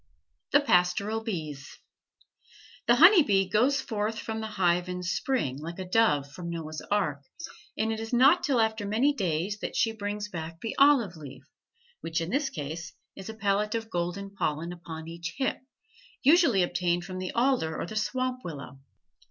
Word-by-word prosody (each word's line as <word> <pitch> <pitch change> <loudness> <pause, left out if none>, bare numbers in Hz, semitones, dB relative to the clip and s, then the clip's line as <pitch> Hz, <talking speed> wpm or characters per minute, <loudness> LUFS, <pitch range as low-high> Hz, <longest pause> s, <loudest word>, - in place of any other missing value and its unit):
THE 285 - +5
PASTORAL 200 -1 +2
BEES 155 - -5 1.1
The 240 - +6
honey 345 - +8
bee 195 -7 +2
goes 250 +8 +2
forth 220 -3 -2
from 220 0 -4
the 220 - -4
hive 180 -4 +1
in 180 0 -4
spring 170 - -1
like 165 +3 -6
the 185 - -6
dove 180 -9 +2
from 170 +3 -7
Noah's 155 -2 -5
ark, 165 -9 0 0.6
and 220 +1 0
it 220 - -4
is 225 0 -6
not 270 +8 +5
till 270 -5 +1
after 220 -1 +1
many 240 +8 +2
days 190 - -2
that - - -5
she 225 - +2
brings 205 -1 -4
back 165 -3 -7
the 225 - -4
olive 265 - +4
leaf, 145 -4 -11 0.6
which 165 0 -2
in 165 +2 -4
this 280 +2 0
case 160 +3 -6 0.2
is 195 +2 -9
a 220 - -7
pellet 210 +1 0
of 225 -1 -4
golden 175 +3 -3
pollen 170 -3 -2
upon 160 -2 -9
each 170 +1 -6
hip, 265 - -1 0.6
usually 285 - +5
obtained 175 0 0
from 185 0 -6
the 185 -1 -4
alder 235 - +1
or - - -2
the 215 - -8
swamp 255 +4 -1
willow. 140 -4 -8
195 Hz, 175 wpm, -28 LUFS, 170-225 Hz, 1.1 s, honey